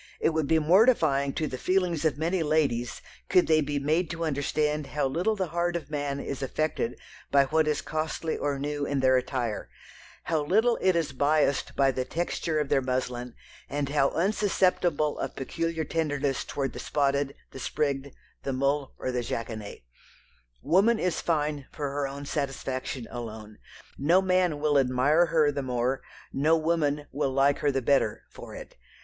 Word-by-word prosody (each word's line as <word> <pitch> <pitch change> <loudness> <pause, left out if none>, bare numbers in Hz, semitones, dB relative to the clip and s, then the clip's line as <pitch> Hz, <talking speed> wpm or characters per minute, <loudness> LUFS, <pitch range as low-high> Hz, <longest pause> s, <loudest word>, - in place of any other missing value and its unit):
It - - +2
would 160 -2 0
be 160 - +4
mortifying 155 - +4
to 155 - -1
the 130 -3 -5
feelings 180 -4 +1
of 155 -3 +2
many 170 +3 0
ladies 145 -6 0 0.3
could 180 -1 +5
they 155 -1 +4
be 145 0 -2
made 155 +4 +1
to 170 -1 -3
understand 150 0 0
how 150 - -1
little 175 +11 0
the 190 -4 -2
heart 175 +1 -1
of 155 -4 -5
man 145 -2 -2
is 140 -1 -5
affected 135 -3 -1 0.3
by 140 -1 +5
what 155 +2 +2
is 150 -1 0
costly 155 +1 -2
or 145 -1 -1
new 145 +1 -3
in 140 -1 0
their 130 0 +4
attire; 125 -3 -2 0.5
how 160 -3 0
little 220 +9 +2
it 185 -2 +3
is 160 -4 0
biassed 145 0 +1
by 135 -1 +4
the 130 0 -2
texture 160 +2 -2
of 150 -2 -1
their 135 - +3
muslin, 125 -1 -3 0.3
and 145 -1 -2
how 140 -1 +3
unsusceptible 180 -5 +1
of - - -4
peculiar 165 +4 -2
tenderness 145 -4 -1
towards 135 -2 -3
the - - -7
spotted, 140 -1 0 0.2
the 135 - -9
sprigged, 140 0 -1 0.3
the 135 - -3
mull, 140 +1 0
or 130 - -3
the 125 -1 -1
jackonet. 110 - -5 0.8
Woman 210 +6 +4
is 180 -5 -1
fine 150 -4 -1
for 145 -3 -4
her 140 0 -1
own 140 +1 -7
satisfaction 135 -3 -3
alone. 110 -3 -7 0.4
No 165 +7 +4
man 185 -5 +2
will 145 -1 +3
admire 135 +6 +3
her 155 -2 +3
the 140 -1 -3
more, 125 0 -1 0.3
no 155 +4 +3
woman 155 -3 0
will 135 -1 -1
like 140 +1 +3
her 145 - +2
the 135 -1 -1
better, 135 -5 +2
for - - -10
it. - - -10
145 Hz, 175 wpm, -27 LUFS, 135-160 Hz, 0.8 s, could